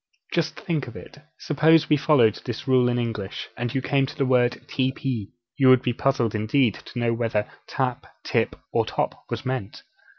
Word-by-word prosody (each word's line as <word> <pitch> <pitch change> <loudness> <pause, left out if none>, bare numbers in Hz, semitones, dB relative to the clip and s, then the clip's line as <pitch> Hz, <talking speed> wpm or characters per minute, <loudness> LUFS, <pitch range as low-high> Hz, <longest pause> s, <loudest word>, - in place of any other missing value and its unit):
Just 165 -2 -1
think 155 -7 -2
of 120 - -10
it! - - -11 0.2
Suppose 160 +1 +3
we 150 - +4
followed 135 -7 +3
this 120 +2 -6
rule 130 -2 +4
in 120 - 0
English, 110 -5 -3
and 120 -1 -3
you 130 - 0
came 135 -1 +2
to - - -9
the 140 - +1
word, 125 -1 +3
'TP,' 130 -5 -2 0.3
you 135 -2 +5
would 130 -1 +6
be 125 - 0
puzzled 120 -3 +1
indeed 110 +2 +2
to - - -10
know 120 -1 +1
whether 115 -3 -1 0.2
tap, 125 -1 -2 0.2
tip, - - 0 0.2
or - - +3
top - - -3
was - - -4
meant! 130 -6 -4
125 Hz, 190 wpm, -24 LUFS, 115-135 Hz, 0.3 s, would